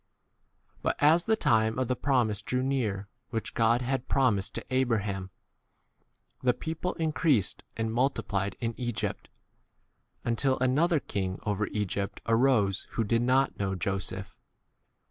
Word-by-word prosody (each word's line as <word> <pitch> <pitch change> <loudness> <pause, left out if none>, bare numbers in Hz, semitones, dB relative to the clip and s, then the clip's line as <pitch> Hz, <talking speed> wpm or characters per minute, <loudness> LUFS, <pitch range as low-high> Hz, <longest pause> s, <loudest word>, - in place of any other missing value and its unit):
But - - 0
as 160 +4 +4
the 220 - +4
time 115 - +2
of 130 -1 0
the 125 - 0
promise 120 -7 +1
drew 125 0 -1
near 110 -8 -1 0.2
which 115 -2 -3
God 115 +2 +3
had 130 0 -1
promised 120 -8 +1
w - - -4
to 130 - -7
Abraham, 105 -7 0 1.1
the 125 -1 +2
people 160 +6 -3
increased 155 - +1
and 115 0 -1
multi 130 +4 +1
18 - - -32
plied 100 -2 -1
in 115 -1 -1
Egypt, 120 -3 -3 0.9
until 130 +3 +1
another 150 +6 +3
king 95 -6 -3
over 105 0 -1
Egypt 100 -1 -2
x 115 - -1
arose 115 -5 +3
who 115 - +1
did 115 +2 +1
not 130 +2 +3
19 - - -28
know 95 -1 -1
Joseph. 95 0 -3
115 Hz, 150 wpm, -29 LUFS, 100-130 Hz, 1.1 s, as